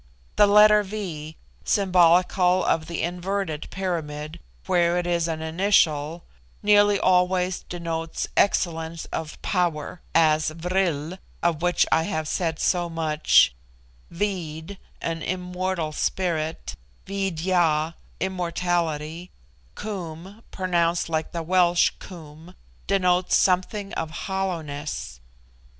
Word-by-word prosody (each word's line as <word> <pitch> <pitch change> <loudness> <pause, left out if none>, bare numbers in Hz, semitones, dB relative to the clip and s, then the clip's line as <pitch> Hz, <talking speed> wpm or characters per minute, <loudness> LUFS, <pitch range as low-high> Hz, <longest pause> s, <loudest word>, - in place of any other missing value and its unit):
The 205 - +6
letter 210 +1 +7
V, 180 -7 -6 0.3
symbolical 180 -1 +3
of 160 -1 +1
the 170 - -3
inverted 175 -2 -3
pyramid, 160 -4 -4 0.3
where 175 -2 +2
it 175 - -1
is 170 -1 0
an 160 -1 -3
initial, 160 -2 +1 0.4
nearly 205 -1 +5
always 180 0 +2
denotes 165 -2 -3
excellence 165 -4 0
of 160 -1 -5
power; 175 -3 -1
as 155 -1 +4
Vril, 170 0 -2 0.2
of 170 -2 +1
which 175 -1 +3
I 160 - +4
have 155 -5 -2
said 165 -1 -1
so 175 0 +1
much; 155 - +3 0.6
Veed, 170 -1 -4 0.3
an 165 -1 -2
immortal 180 -2 -2
spirit; 160 -1 -2 0.3
Veed 195 -4 -3
ya, 165 -4 +2 0.3
immortality; 175 -2 -2 0.5
Koom, 190 0 -7
pronounced 175 -3 0
like 160 -1 -2
the 170 -1 -4
Welsh 175 0 +3
Cwm, 165 0 -12 0.3
denotes 180 -2 +2
something 195 +2 +1
of 160 - -3 0.2
hollowness. 155 - -4
175 Hz, 105 wpm, -24 LUFS, 160-185 Hz, 0.6 s, letter